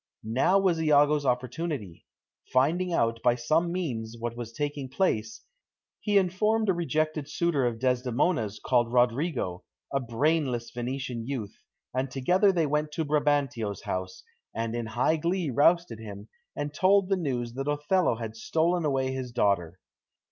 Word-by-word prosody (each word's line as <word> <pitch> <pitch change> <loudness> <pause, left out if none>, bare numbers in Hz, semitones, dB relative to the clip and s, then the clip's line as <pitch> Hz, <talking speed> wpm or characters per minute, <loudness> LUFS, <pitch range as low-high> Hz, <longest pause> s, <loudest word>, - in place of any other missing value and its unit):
Now 130 - +2
was 185 -4 +2
Iago's 150 -1 +4
opportunity. 125 - -3 0.4
Finding 165 +8 +2
out 115 -7 +1
by 120 -1 +3
some 155 +8 +1
means 120 -11 -3
what 115 0 -4
was 120 -1 -6
taking 145 +1 -3
place, 115 - -1 0.6
he 205 -2 +2
informed 210 +4 +2
a - - +5
rejected 155 -3 -1
suitor 150 -5 +1
of 115 -1 -2
Desdemona's 125 - 0
called 120 -2 +2
Roderigo, 125 - +1 0.3
a 135 - +2
brainless 125 0 0
Venetian 125 -1 -4
youth, 125 -7 -4 0.4
and 130 +1 -1
together 180 +10 +3
they 170 -4 +1
went 150 +1 -1
to 160 0 -1
Brabantio's 145 -8 0
house, 95 0 -4 0.3
and 115 0 -2
in 120 -1 -3
high 125 +8 +1
glee 170 -1 -1
roused 170 +7 +3
him, 105 -2 -9 0.3
and 145 0 -4
told 190 +4 +4
the 195 - +2
news 125 -9 -2
that 135 +2 -4
Othello 150 +1 +1
had 115 -1 -6
stolen 165 +8 0
away 135 -2 0
his 130 -2 -4
daughter. 95 -7 +1
135 Hz, 150 wpm, -28 LUFS, 120-165 Hz, 0.6 s, a